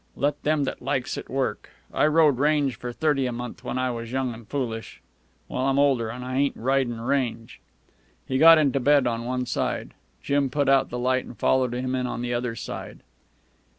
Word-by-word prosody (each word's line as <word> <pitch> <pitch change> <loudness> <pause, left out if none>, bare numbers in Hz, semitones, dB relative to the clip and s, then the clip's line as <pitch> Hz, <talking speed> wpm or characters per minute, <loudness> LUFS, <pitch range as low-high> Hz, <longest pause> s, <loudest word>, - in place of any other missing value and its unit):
Let 145 +1 -1
them 150 -1 +1
that 135 - -4
likes 135 -1 -2
it, - - -7
work. 135 0 -2 0.2
I - - +3
rode 155 -4 +4
range 145 -2 +2
for 125 - -6
thirty 135 0 +1
a - - -2
month 120 0 -7
when 125 - -3
I 130 0 0
was 115 -1 -6
young 130 -2 -1
an' 115 0 -12
foolish. 115 -3 -4 0.5
Well, 130 +1 -1
I'm 135 0 +1
older, 135 -5 +2
an' 125 +2 -6
I 130 +1 -3
ain't 140 0 +1
ridin' 130 -1 0
range." 120 -2 -2 0.6
He 130 - -1
got 165 +1 +9
into 140 -3 +2
bed 140 +1 +4
on 115 -1 -1
one 125 0 -2
side. 120 - -2 0.3
Jim 140 -1 +1
put 140 +1 0
out 135 0 +4
the 125 - -4
light 130 +1 0
and 120 - -11
followed 130 -2 +2
him 130 +1 -2
in 125 -1 -1
on 120 0 -4
the 120 0 -2
other 120 -1 -2
side. - - -7
130 Hz, 205 wpm, -25 LUFS, 120-140 Hz, 0.6 s, got